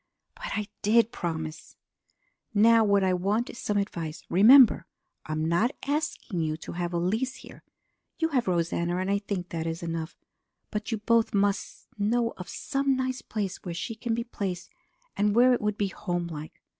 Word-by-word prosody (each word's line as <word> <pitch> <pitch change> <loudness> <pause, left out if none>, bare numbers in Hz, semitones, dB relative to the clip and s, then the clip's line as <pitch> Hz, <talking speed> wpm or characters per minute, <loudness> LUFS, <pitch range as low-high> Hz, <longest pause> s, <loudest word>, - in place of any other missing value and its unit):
But - - -6
I 210 - -1 0.2
did 225 +2 +4
promise! 160 -4 -5 0.8
"Now 225 +2 +6
what 200 -2 +3
I 185 -1 +2
want 200 +6 0
is - - -11
some 210 - -1
advice. 170 -6 -3
Remember, 220 +1 +7 0.4
I 155 - -3
am 155 0 -1
not 175 +10 +1
asking 285 - -2
you 155 -1 -1
to - - -8
have 175 0 -3
Elise 215 +10 -1
here. - - -13 0.6
You 325 -1 +1
have 255 -7 0
Rosanna 170 0 0
and 185 +1 -1
I 200 - +2
think 195 -3 -4
that 165 -1 -3
is 165 +1 -4
enough. 165 0 -4 0.5
But 210 +2 -3
you 225 - 0
both 230 +1 +2
must 200 0 -1
know 230 +3 +1
of 180 - -8
some 275 0 0
nice 255 0 -2
place 200 -4 -3
where 175 -3 -5
she 225 +7 -4
can 225 +1 -2
be 235 - -2
placed 190 -6 -5 0.4
and 205 +1 +1
where 250 +2 +6
it 245 - 0
would 210 0 -1
be 200 -1 0
homelike. 170 -5 -5
200 Hz, 180 wpm, -27 LUFS, 175-230 Hz, 0.8 s, Remember